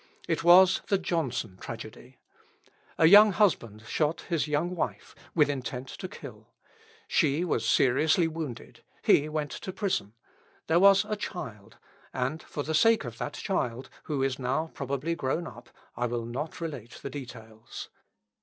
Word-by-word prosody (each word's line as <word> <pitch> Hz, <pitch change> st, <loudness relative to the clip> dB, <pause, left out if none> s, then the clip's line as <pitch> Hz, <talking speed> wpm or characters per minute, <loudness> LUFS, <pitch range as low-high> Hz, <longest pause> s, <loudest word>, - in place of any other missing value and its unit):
It 165 Hz, 0 st, -1 dB
was 180 Hz, +2 st, +7 dB
the 195 Hz, -, +3 dB
Johnson 130 Hz, -, -2 dB
tragedy. 115 Hz, +2 st, -9 dB, 0.8 s
A 160 Hz, -, +5 dB
young 205 Hz, +4 st, +8 dB
husband 120 Hz, -, +1 dB
shot 150 Hz, +6 st, -1 dB
his 165 Hz, -3 st, -1 dB
young 155 Hz, +5 st, -1 dB
wife, 170 Hz, -, -4 dB, 0.2 s
with 150 Hz, -3 st, +5 dB
intent 130 Hz, -2 st, -4 dB
to 185 Hz, -, -7 dB
kill. 185 Hz, -, -11 dB, 0.6 s
She 155 Hz, +2 st, +2 dB
was 175 Hz, -, 0 dB
seriously 155 Hz, +6 st, +3 dB
wounded. 155 Hz, -7 st, -7 dB, 0.2 s
He 150 Hz, +2 st, +4 dB
went 150 Hz, -1 st, -3 dB
to 190 Hz, -, -6 dB
prison. 185 Hz, -, -2 dB, 0.5 s
There 165 Hz, +1 st, +3 dB
was 195 Hz, 0 st, +6 dB
a 215 Hz, -, -2 dB
child, 115 Hz, -, -7 dB, 0.4 s
and 130 Hz, +5 st, -2 dB
for 145 Hz, -, -5 dB
the 160 Hz, -, -3 dB
sake 225 Hz, +7 st, +4 dB
of 115 Hz, -2 st, -8 dB
that 145 Hz, -, -4 dB
child, 125 Hz, -9 st, -3 dB
who 145 Hz, -3 st, -1 dB
is 135 Hz, -1 st, -1 dB
now 135 Hz, +6 st, -1 dB
probably 140 Hz, +4 st, -2 dB
grown 165 Hz, +2 st, -2 dB
up, 120 Hz, -4 st, -11 dB, 0.3 s
I 120 Hz, +1 st, -1 dB
will 120 Hz, -1 st, -3 dB
not 145 Hz, +9 st, -5 dB
relate 145 Hz, -9 st, -6 dB
the 140 Hz, -, -5 dB
details. 115 Hz, -4 st, -9 dB
145 Hz, 155 wpm, -28 LUFS, 125-170 Hz, 0.8 s, young